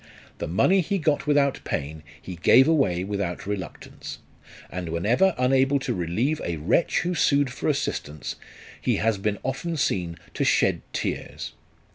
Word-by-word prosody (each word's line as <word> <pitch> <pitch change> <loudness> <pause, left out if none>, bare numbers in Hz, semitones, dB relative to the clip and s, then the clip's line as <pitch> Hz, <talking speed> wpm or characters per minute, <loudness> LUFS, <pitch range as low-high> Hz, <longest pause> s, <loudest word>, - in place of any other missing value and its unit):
The - - -3
money 180 - +3
he 195 +4 -1
got 155 -4 0
without 145 -2 +3
pain 75 +3 -4 0.2
he 90 - -8
gave 130 - +6
away 135 - +2
without 100 -3 -3
reluctance; 100 -3 -6 0.5
and 90 -2 -4
whenever 115 - +2
unable 135 +2 +3
to 135 - -2
relieve 105 - -1
a 85 -1 -2
wretch 85 - +2
who 180 +1 -1
sued 140 -5 +2
for - - -2
assistance, 75 0 -3 0.5
he - - +1
has 110 -2 +1
been 105 +1 -1
often 160 +5 -3
seen 90 - -1 0.2
to - - -1
shed - - +2
tears. - - -4
115 Hz, 150 wpm, -25 LUFS, 90-145 Hz, 0.5 s, gave